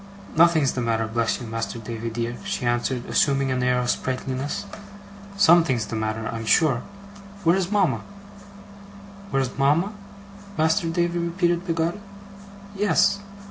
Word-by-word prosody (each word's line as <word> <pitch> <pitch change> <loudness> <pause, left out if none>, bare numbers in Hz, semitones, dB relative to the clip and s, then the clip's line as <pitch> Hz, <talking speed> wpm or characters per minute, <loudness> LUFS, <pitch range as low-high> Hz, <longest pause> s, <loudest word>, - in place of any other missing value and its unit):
'Nothing's 160 -4 +5
the 125 - -3
matter, 115 -1 0
bless 115 0 -1
you, 125 - -7
Master 115 +1 -4
Davy 115 0 -5
dear!' 120 +1 -3
she 200 -10 -3
answered, 120 +1 0
assuming 135 -1 +2
an 130 0 0
air 125 0 +2
of 125 0 -1
sprightliness. 130 +2 -3 0.7
'Something's 160 - +4
the 110 - -5
matter, 110 0 -2
I'm 115 0 -4
sure. 135 +1 +3 0.6
Where's 180 +2 +2
mama?' 195 -9 +2 1.3
'Where's 135 -6 -1
mama, 160 +9 +2 0.6
Master 160 +3 +2
Davy?' 170 +1 0
repeated 175 +1 0
Peggotty. 165 +3 -1 0.8
'Yes. 200 0 +3
135 Hz, 130 wpm, -24 LUFS, 120-170 Hz, 1.3 s, Nothing's